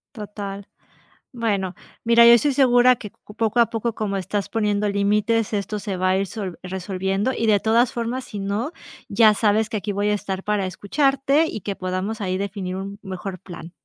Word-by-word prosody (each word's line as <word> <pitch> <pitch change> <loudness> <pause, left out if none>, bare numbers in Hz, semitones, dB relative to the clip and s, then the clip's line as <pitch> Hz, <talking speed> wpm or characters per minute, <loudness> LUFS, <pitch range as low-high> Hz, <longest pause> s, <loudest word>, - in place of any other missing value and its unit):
Total. 200 -2 -7 0.6
Bueno, 200 -6 -1 0.3
mira, 235 0 +6
yo 235 - +9
estoy 280 +5 +4
segura 250 -2 +5
que 210 - -8
c 210 - -17
poco 225 +1 +1
a 235 - +6
poco, 230 -1 -2
como 205 -2 -2
estás 195 +1 -2
poniendo 210 -2 0
límites, 210 +3 +1
esto 210 0 -2
se 195 -1 -4
va 185 +1 +1
a 185 - +3
ir 195 - 0
sol 195 -3 -6
resolviendo 190 +4 -2
y, 230 - -1
de 205 -2 +4
todas 230 +2 +3
formas, 240 +2 -3
si 205 - -7
no, 205 - -2 0.4
ya 220 -2 +5
sabes 215 +1 +2
que - - -2
aquí 205 +1 -3
voy 205 +1 0
a - - +2
estar 195 -2 -4
para 210 -2 0
escucharte 275 - +1
y 220 - -5
que 200 -2 -4
podamos 185 +4 -3
ahí 185 -1 -1
definir 195 -2 -4
un 195 +1 -6
mejor 190 -1 -6
plan. 175 -1 -10
205 Hz, 195 wpm, -22 LUFS, 195-230 Hz, 0.6 s, yo